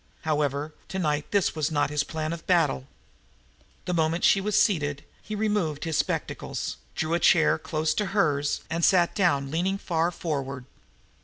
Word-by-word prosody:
However, 150 -1 -1
tonight 150 -6 -1
this 200 -3 +2
was 155 -1 0
not 145 -2 0
his 150 -1 +1
plan 155 0 -3
of 170 - -9
battle. 155 - +2 1.0
The 180 - -1
moment 165 +1 +1
she 195 - +5
was 210 +1 +2
seated, 145 -9 +1 0.2
he 215 - -6
removed 205 -8 -1
his 165 -2 -2
spectacles, - - -2 0.2
drew 160 +1 -1
a 170 - +2
chair 165 -2 +4
close 155 0 -1
to 210 - -1
hers 150 -8 +1
and 165 +1 -2
sat 175 -2 +4
down, 140 -9 +1
leaning 185 +5 0
far 170 -3 0
forward. 140 -6 -4
160 Hz, 160 wpm, -26 LUFS, 150-180 Hz, 1.0 s, she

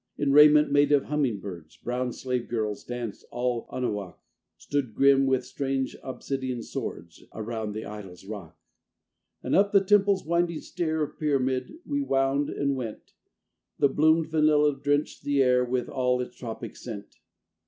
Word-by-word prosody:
In 145 -1 +1
raiment 150 +1 +7
made 145 +1 +4
of 145 -2 +4
humming 140 -8 0
birds 85 -6 -9
Brown 125 +1 -2
slave 125 -1 -3
girls 110 -3 -2
danced. 120 -4 -6
All 120 -1 -2
Anahuac 105 -7 -3 0.4
Stood, 135 -7 -3
grim 135 0 +5
with 130 -1 +1
strange 135 0 -2
obsidian 130 -2 -4
swords, 85 -6 -6
Around 110 -1 -4
the 110 +1 -5
idol's 95 -4 -9
rock. 95 -6 -8 0.9
And - - 0
up 200 +1 +4
the 200 - +8
temple's 200 -1 +3
winding 170 0 0
stair 160 -3 -2
Of 150 - -7
pyramid 130 - 0
we 285 0 -1
wound 135 - +1
and 140 -1 -1
went: 120 -5 -7 0.6
The 140 - +4
bloomed 155 +3 +3
vanilla 150 -2 +4
drenched 145 +2 -1
the 140 -1 +3
air 125 -1 +4
With 125 0 -1
all 125 -1 0
its 125 - -5
tropic 115 -3 -7
scent. 105 -5 -8
130 Hz, 155 wpm, -27 LUFS, 120-145 Hz, 0.9 s, the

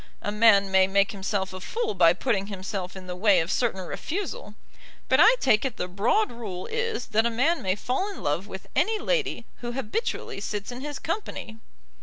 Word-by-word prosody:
A 205 - -1
man 205 -2 +5
may 190 0 +5
make 195 +1 +2
himself 195 -1 -2
a 185 - -6
fool 450 - -2
by 170 -3 +6
putting 200 0 -1
himself 190 -2 -5
in 190 -1 -9
the 180 0 -5
way 195 0 +4
of 165 +2 -1
certain 225 -6 0
refusal; 400 - -5 0.5
but - - +3
I 480 - +8
take 215 - +3
it 265 -4 -3
the 180 - -2
broad 220 - +1
rule 205 -7 -6
is 460 - -2
that 225 0 +3
a - - +1
man 260 +9 +1
may 185 -1 0
fall 260 - -2
in 395 - -9
love 165 +7 -1
with 190 -1 -8
any 430 +11 +2
lady 445 - -1
who 240 0 -5
habitually 260 - -3
sits 210 +2 -4
in 245 +1 -7
his 290 0 -5
company." 320 - -5
215 Hz, 200 wpm, -26 LUFS, 190-275 Hz, 0.5 s, I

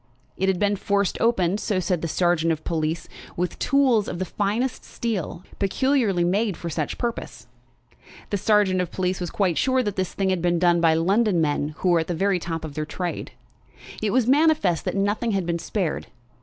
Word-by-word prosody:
It 190 +1 0
had 190 - +1
been 205 +1 +1
forced 200 0 0
open, 200 -4 +2
so 205 -4 -1
said 180 -2 -1
the 165 - -2
sergeant 170 0 +1
of 160 -1 -3
police, 160 0 -2 0.3
with 180 0 -2
tools 260 -6 +3
of - - -4
the 185 - -2
finest 210 +7 -1
steel, 190 -6 -4 0.2
peculiarly 210 -2 +1
made 195 +1 +1
for 170 - -5
such 155 -1 -3
purpose. 235 -1 -4 0.9
The 205 - +1
sergeant 200 -2 +3
of 180 - -3
police 185 0 -1
was 175 - -2
quite 185 -4 0
sure 260 -1 +2
that 205 -3 -3
the 190 - +2
thing 190 +1 -1
had 185 -2 0
been 175 0 +2
done 175 0 +3
by 165 -1 +4
London 195 +3 +2
men 150 -1 0
who 185 - 0
were 170 -1 +4
at 160 - -2
the 175 - -2
very 195 +2 +1
top 165 -1 -4
of 150 - -8
their 155 - -2
trade. 175 +3 -5 0.7
It 215 - +1
was 250 +2 +2
manifest 275 - +3
that - - -2
nothing 205 +3 0
had 190 -3 0
been 170 0 -1
spared. 170 0 -2
185 Hz, 200 wpm, -24 LUFS, 170-210 Hz, 0.9 s, by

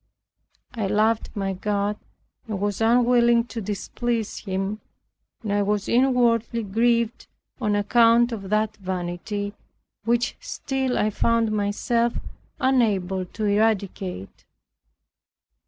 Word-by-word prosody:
I 220 -5 -2
loved 215 +3 +1
my 195 -1 -1
God 205 +2 -1 0.5
and 210 -3 -3
was 205 +1 -2
unwilling 235 0 +4
to 235 -1 -6
displease 220 +3 -3
Him, 195 +2 -3 0.6
and 205 -2 -2
I 205 - +2
was 205 0 0
inwardly 235 -2 +2
grieved 230 +3 +1 0.3
on 210 -4 +1
account 230 +3 +4
of 200 -4 -5
that 215 +1 0
vanity, 190 +2 -4 0.5
which 235 +2 0
still 265 -2 -2
I 215 - +1
found 230 +1 +1
myself 225 +3 0 0.5
unable 205 - +1
to 215 +4 -5
eradicate. 200 - -1
215 Hz, 105 wpm, -24 LUFS, 200-235 Hz, 0.6 s, unwilling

